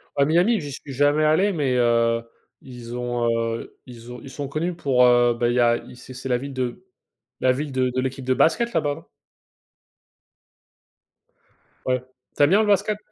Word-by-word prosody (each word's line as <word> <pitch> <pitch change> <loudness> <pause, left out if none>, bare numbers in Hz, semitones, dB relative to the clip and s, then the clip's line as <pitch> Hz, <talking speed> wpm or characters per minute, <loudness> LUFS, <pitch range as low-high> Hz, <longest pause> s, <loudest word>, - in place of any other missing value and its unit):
À 140 - +3
Miami, 180 +9 +3
j'y 145 -2 -7
suis 140 0 -9
jamais 145 +3 +2
allé 160 +7 +3
mais, 140 -5 0
heu, 115 -1 +2 0.4
ils 120 -2 -9
ont, 120 -1 -2 0.3
heu, - - -9
ils 120 -1 -11
ont 125 - -9
ils - - -11
sont 140 +1 -6
connus 165 +5 -3
pour, 130 -6 +2
heu, 120 -1 +4
bah, 120 0 0
il 120 - 0
y 125 - +2
a 120 0 +3
c'est 130 +1 -12
c'est 130 +1 -7
la 125 - +2
ville 140 +2 -7
de 130 +8 -4 0.5
la 130 0 +3
ville 145 +2 -4
de 130 -1 0
de 130 - +1
l'équipe 130 0 -4
de 130 0 +1
basket 235 - +2
là-bas, 145 -7 0
non? - - -15 2.8
Ouais, 130 -1 0 0.3
tu - - +3
aimes 145 - +5
bien 205 +4 +4
le 215 - 0
basket? 205 +1 +2
130 Hz, 190 wpm, -23 LUFS, 125-150 Hz, 2.8 s, aimes